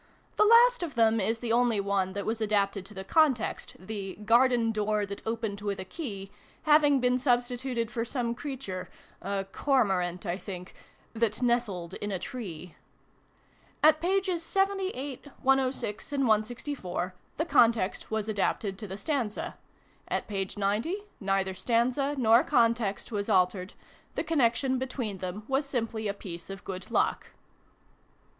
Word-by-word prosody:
The 425 - +5
last 475 +2 +7
of 335 -5 -4
them 225 -1 +4
is 225 +4 +1
the 230 0 -3
only 240 -3 +3
one 195 -1 0
that 200 0 -4
was 225 0 -2
adapted 200 -2 +1
to 210 - -13
the 190 - -5
context, 280 0 +1
the 195 0 -6
" - - -9
Garden 235 0 +4
Door 210 -1 0
that 200 0 -7
opened 220 -3 -2
with 200 -2 -2
a 190 - -5
key" 200 - -6 0.3
having 295 -2 +5
been 250 0 +2
substituted 245 -2 0
for 230 -2 -1
some 235 -1 -1
creature 245 -8 -6 0.3
(a 195 -1 -2
Cormorant, 190 -9 +1
I 180 +1 -2
think) 180 -1 -8 0.2
" - - -34
that 230 +1 0
nestled 210 -8 0
in 205 +1 -4
a 190 - -1
tree." 180 - -7 1.1
At 310 0 +6
pp. 375 0 +1
78, 375 -7 -1 0.2
1 265 -1 +4
06, 215 +2 -5
and 280 -1 +1
164, 215 -5 -1 0.2
the 320 - 0
context 230 - +3
was 220 -1 -2
adapted 200 -1 -1
to 215 - -6
the 190 +1 -6
stanza. 235 -2 -2 0.5
At - - -2
p. 195 -2 -2
90, 210 - 0 0.2
neither 195 -1 0
stanza 245 +8 +1
nor 235 -1 +5
context 230 -6 +1
was 205 -2 -2
altered: 185 +1 +2 0.4
the - - -1
connection 260 -3 +2
between 250 -6 -3
them 185 +3 -5
was 275 +1 0
simply 230 -4 -2
a 200 - -1
piece 170 -3 -8
of 195 0 -7
good 185 -1 -6
luck. - - +1
225 Hz, 155 wpm, -29 LUFS, 195-260 Hz, 1.1 s, last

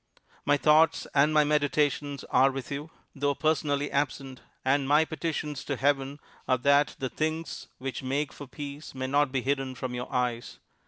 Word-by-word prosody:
"My 145 0 +4
thoughts 155 +2 +4
and 145 +2 +4
my 155 -1 +5
meditations 145 -1 0
are 130 +2 +5
with 135 +1 -6
you, 145 +3 -4 0.2
though 140 0 0
personally 145 -1 0
absent; 135 -2 -2 0.2
and 135 +1 +2
my 150 +3 +5
petitions 155 -3 -3
to 140 - -1
Heaven 140 +1 0 0.3
are 130 - +3
that 140 +3 +3
the 130 - -2
things 160 +3 -3
which 135 0 -5
make 140 +2 -2
for 145 - -9
peace 145 +2 -8
may 130 0 -3
not 140 +1 +2
be 130 -2 -1
hidden 135 -1 -1
from 125 0 -4
your 125 0 -5
eyes. 125 -2 -2
140 Hz, 170 wpm, -28 LUFS, 135-150 Hz, 0.3 s, my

